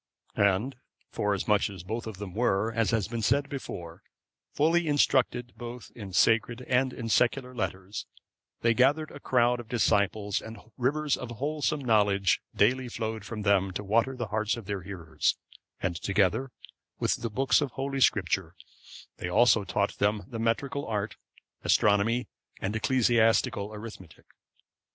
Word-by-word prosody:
And 100 Hz, +6 st, +1 dB, 0.3 s
forasmuch 105 Hz, 0 st, +1 dB
as 95 Hz, -4 st, -9 dB
both 110 Hz, +5 st, -4 dB
of 110 Hz, -4 st, -7 dB
them 100 Hz, -2 st, -7 dB
were, 110 Hz, 0 st, +1 dB
as 115 Hz, -1 st, +1 dB
has 110 Hz, -4 st, +1 dB
been 115 Hz, 0 st, -4 dB
said 140 Hz, +6 st, +2 dB
before, 85 Hz, -, -7 dB, 0.5 s
fully 165 Hz, +3 st, +2 dB
instructed 130 Hz, -4 st, +2 dB
both 120 Hz, 0 st, -8 dB
in 100 Hz, -5 st, -8 dB
sacred 115 Hz, +5 st, +2 dB
and 125 Hz, +1 st, +1 dB
in 115 Hz, -2 st, -6 dB
secular 125 Hz, +4 st, +1 dB
letters, 95 Hz, -2 st, -4 dB, 0.5 s
they 115 Hz, 0 st, +4 dB
gathered 140 Hz, +6 st, +2 dB
a 145 Hz, -, -10 dB
crowd 125 Hz, -2 st, +2 dB
of 120 Hz, -, -8 dB
disciples, 105 Hz, -3 st, +1 dB
and 110 Hz, +1 st, -9 dB, 0.2 s
rivers 145 Hz, +4 st, +1 dB
of 125 Hz, -, -7 dB
wholesome 145 Hz, +5 st, -1 dB
knowledge 105 Hz, -5 st, +2 dB
daily 125 Hz, +4 st, +2 dB
flowed 110 Hz, -3 st, -4 dB
from 110 Hz, -2 st, -5 dB
them 100 Hz, -2 st, +3 dB
to 105 Hz, -, -4 dB
water 115 Hz, +6 st, +1 dB
the 120 Hz, -4 st, -4 dB
hearts 110 Hz, +2 st, 0 dB
of 115 Hz, -, -8 dB
their 100 Hz, -1 st, -3 dB
hearers; 90 Hz, -4 st, -2 dB, 0.5 s
and, 90 Hz, -2 st, 0 dB
together 105 Hz, +6 st, +1 dB, 0.5 s
with -, -, 0 dB
the 115 Hz, -, -2 dB
books 135 Hz, +7 st, +2 dB
of 145 Hz, -, -1 dB
Holy 135 Hz, 0 st, -3 dB
Scripture, -, -, +2 dB, 0.6 s
they 90 Hz, -, -4 dB
also 115 Hz, +2 st, +4 dB
taught 100 Hz, +1 st, -1 dB
them 105 Hz, 0 st, +1 dB
the 115 Hz, -, -6 dB
metrical 135 Hz, +5 st, -1 dB
art, 105 Hz, -1 st, -2 dB, 0.5 s
astronomy, 110 Hz, +4 st, +3 dB, 0.3 s
and 100 Hz, +3 st, -2 dB
ecclesiastical 115 Hz, -4 st, +2 dB
arithmetic. 105 Hz, -6 st, -10 dB
115 Hz, 150 wpm, -28 LUFS, 100-125 Hz, 0.6 s, they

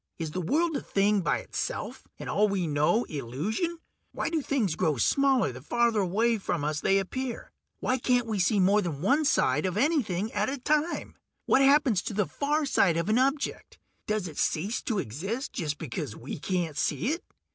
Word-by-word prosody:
Is 160 Hz, -3 st, -4 dB
the 185 Hz, -, -3 dB
world 320 Hz, -, +1 dB
a -, -, -1 dB
thing 200 Hz, 0 st, +2 dB
by -, -, +1 dB
itself, -, -, -5 dB
and -, -, -8 dB
all 210 Hz, +1 st, +2 dB
we 195 Hz, -3 st, 0 dB
know 150 Hz, +9 st, +2 dB
illusion? 160 Hz, -, -3 dB, 0.4 s
Why -, -, -2 dB
do 325 Hz, -2 st, 0 dB
things 250 Hz, -, 0 dB
grow 160 Hz, -4 st, 0 dB
smaller 265 Hz, -, +3 dB
the 130 Hz, +1 st, -10 dB
farther 235 Hz, -, +1 dB
away 215 Hz, +5 st, +1 dB
from 170 Hz, -5 st, -2 dB
us 150 Hz, 0 st, -1 dB
they 195 Hz, -, +3 dB
appear? 240 Hz, +5 st, -4 dB, 0.3 s
Why 255 Hz, +1 st, 0 dB
can't 245 Hz, 0 st, +2 dB
we 215 Hz, -3 st, -2 dB
see 195 Hz, +4 st, +2 dB
more 200 Hz, +3 st, +4 dB
than 160 Hz, -7 st, -4 dB
one 285 Hz, +8 st, +3 dB
side 150 Hz, -, +2 dB
of 185 Hz, +1 st, -3 dB
anything 225 Hz, -, +1 dB
at 205 Hz, +3 st, 0 dB
a 280 Hz, -, -3 dB
time? 305 Hz, +5 st, -1 dB, 0.3 s
What 270 Hz, -, +4 dB
happens 270 Hz, -7 st, +4 dB
to 210 Hz, -, -5 dB
the 210 Hz, -1 st, +2 dB
far 295 Hz, +6 st, -1 dB
side 180 Hz, -, +3 dB
of 170 Hz, +4 st, -1 dB
an 220 Hz, +3 st, +3 dB
object; 275 Hz, +2 st, -1 dB, 0.3 s
does 215 Hz, -3 st, -1 dB
it 155 Hz, -, -8 dB
cease 195 Hz, +9 st, 0 dB
to 225 Hz, -, -1 dB
exist 195 Hz, -, -4 dB
just 150 Hz, -6 st, -2 dB
because 120 Hz, -8 st, -5 dB
we 130 Hz, -, -7 dB
can't 170 Hz, -3 st, -2 dB
see 155 Hz, -, 0 dB
it? 340 Hz, +3 st, -3 dB
205 Hz, 195 wpm, -28 LUFS, 170-260 Hz, 0.4 s, more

